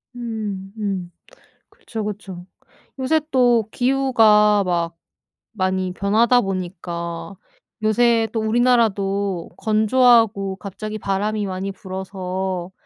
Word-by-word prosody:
음음. 205 -5 -4 0.6
그쵸, 220 -2 -7
그쵸. 195 -4 -6 0.5
요새 310 +5 +2
또 240 -4 +3
기후가 225 -6 +4
막 170 -2 -1 0.6
많이 185 -2 -1
변하다 225 +6 +3
보니까 175 -2 -5 0.5
요새 225 +1 +3
또 225 - 0
우리나라도 205 -5 +1
건조하고 220 -3 +3
갑자기 210 +2 -6
바람이 205 +2 -1
많이 190 +1 -4
불어서 190 -1 -5
205 Hz, 205 characters per minute, -21 LUFS, 190-225 Hz, 0.6 s, 기후가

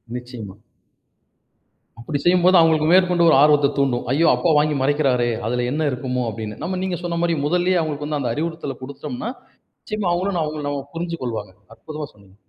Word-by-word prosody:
நிச்சயமா. 115 -5 -8 1.4
அப்படி 120 +5 -3
செய்யம்போது 180 +1 +5
அவுங்களுக்கு 160 -2 +3
மேற்கொண்டு 180 -2 +4
ஒரு - - +6
ஆர்வத்த 145 -1 +5
தூண்டும். 135 -3 +1
"ஐயோ! 160 +5 +3
அப்பா 170 - 0
வாங்கி 150 0 +2
மறைக்கிறாரே, 135 -3 +2 0.2
அதில 125 +1 -1
என்ன 155 +1 0
இருக்குமோ!" 125 0 -2
அப்படின்னு. 105 -1 -6
நம்ம 185 +2 -2
நீங்க 185 -2 -2
சொன்ன 170 -1 -2
மாரி 170 -1 +1
முதல்லயே 180 +3 +2
அவுங்களுக்கு 150 -2 -3
வந்து 150 -1 -2
அந்த 125 -4 -1
அறிவுறுத்தல 160 -2 -4
குடுத்தோம்ன்னா, 140 - -6 0.5
நிச்சயமா 210 -4 -3
அவுங்களும் 185 +2 -1
ந - - +1
அவங்களும் 150 -1 -4
நம்ம 140 -1 -4
புரிஞ்சு 170 0 -3
கொள்வாங்க. 110 -6 -4 0.2
அற்புதமா 155 -1 -7
சொன்னீங்க. 100 -2 -21
150 Hz, 170 wpm, -21 LUFS, 125-170 Hz, 1.4 s, ஒரு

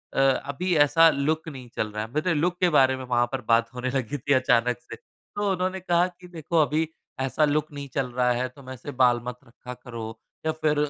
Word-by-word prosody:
"अ - - +1 0.3
अभी 180 +6 -1
ऐसा 165 +3 +6
लुक 155 +2 -1
नहीं 130 -5 -10
चल 110 - -1
रहा 105 +1 -3
है।" 110 - -8
मेरे 155 +4 +1
लुक 175 +3 0
के 180 -2 +4
बारे 135 -4 +4
में 130 - -7
वहाँ 120 -1 +2
पर 135 -2 -3
बात 115 +1 +3
होने 125 +1 -3
लगी 135 +1 -2
थी 140 +2 0
अचानक 125 -2 +2
से। 125 - -9
तो 205 -1 -5
उन्होंने 185 0 -1
कहा 175 -1 +2
कि, 180 0 -14
"देखो, 170 -1 -3
अभी 155 +2 +1 0.3
ऐसा 135 +3 +2
लुक 150 +1 0
नहीं 140 -1 -7
चल 135 -2 0
रहा 125 0 +2
है। 125 +1 -1
तुम 130 +1 -14
ऐसे 130 +2 -7
बाल 120 -2 +5
मत 125 0 -5
रखा 125 +2 -10
करो, 115 -3 -8 0.3
या 160 - +2
फिर 155 -1 0
140 Hz, 225 wpm, -25 LUFS, 125-160 Hz, 0.3 s, ऐसा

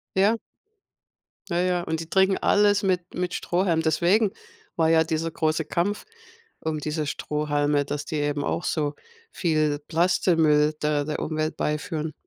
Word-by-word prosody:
Ja. 200 +4 +4 1.1
Ja, 170 - -1
ja, 180 -1 +1
und 160 -1 -2
die 165 - -7
trinken 190 +1 +3
alles 205 0 +3
mit 180 -2 -1
mit 180 0 -2
Strohhalm. 175 -2 0
Deswegen 175 +7 +3 0.5
war 160 -1 +3
ja 165 0 +5
dieser 160 +1 -2
große 155 0 0
Kampf 180 +7 -1 0.6
um 155 -1 -2
diese 150 +1 -3
Strohhalme, 145 -1 0
dass 145 +1 -4
die 155 - -4
eben 145 -1 -1
auch - - -1
so 150 -2 -1 0.4
viel 155 -4 0
Plastikmüll 160 -3 +3
da 150 -1 +1
der 150 +1 -3
Umwelt 155 0 -2
beiführen. 155 0 -2
160 Hz, 145 wpm, -25 LUFS, 150-180 Hz, 1.1 s, ja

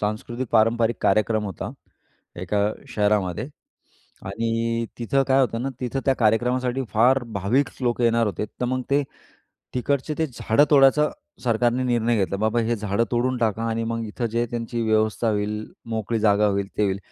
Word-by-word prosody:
सांस्कृतिक 120 +4 -3
पारंपरिक 115 +1 +3
कार्यक्रम 110 0 +2
होता, 95 -4 -5 0.7
एका 100 +3 -1 0.3
शहरामध्ये 105 - 0 0.8
आणि 115 +3 -1
तिथं 135 +4 +1
काय 135 +1 +4
होतं 120 -2 0
ना, 135 - -1
तिथं 125 +2 -2
त्या 135 - +4
कार्यक्रमासाठी 125 +3 +1
फार 125 +4 +4 0.2
भाविक 125 +9 +1
लोकं 120 0 +1
येणार 115 -1 +3
होते, 105 +1 -2
तर 125 - -6
मग 130 0 -1
ते 145 +1 +3 0.7
तिकडचे, 140 +4 -1
ते 160 - +1
झाडं 120 +1 +2
तोडायचा 145 +1 +5 0.4
सरकारने 120 +2 +1
निर्णय 120 -1 +1
घेतला. 100 -1 0
बाबा, 110 +3 +1
हे 115 +1 0
झाडं 105 +2 0
तोडून 125 +1 +1
टाका 115 -1 0
आणि 115 0 -1
मग 115 0 -3
इथं 115 +3 -3
जे 115 - -1
आहे, 120 - +1
त्यांची 115 0 -3
व्यवस्था 110 +1 +1
होईल, 105 +1 -2 0.3
मोकळी 110 +1 -1
जागा 105 0 +4
होईल, 100 -1 0
ते - - +3
होईल. 95 0 0
115 Hz, 165 wpm, -23 LUFS, 110-125 Hz, 0.8 s, तोडायचा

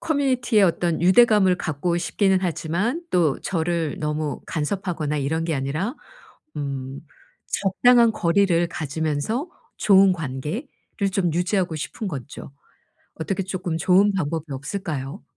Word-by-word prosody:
커뮤니티에 255 -8 +1
어떤 170 -2 +1
유대감을 190 -1 +5
갖고 170 +3 -1
싶기는 190 +2 +1
하지만 185 - -1
또 165 -6 +2
저를 165 -3 -2
너무 150 -1 -2
간섭하거나 160 -2 -2
이런 160 +4 -1
게 165 -1 -1
아니라 150 - -2 0.6
음 135 -1 -5 0.5
적당한 235 +4 +3
거리를 175 -2 +2
가지면서 160 - -2 0.3
좋은 195 -1 +5
관계를 155 - -4 0.5
좀 180 -5 +1
유지하고 180 0 0
싶은 195 +7 -5
거죠. 140 -3 -8 0.6
어떻게 195 +5 -3
쪼끔 180 -3 -3
좋은 195 +4 +4
방법이 165 -4 -2
없을까요? 135 -1 -5
175 Hz, 290 characters per minute, -23 LUFS, 150-195 Hz, 0.6 s, 유대감을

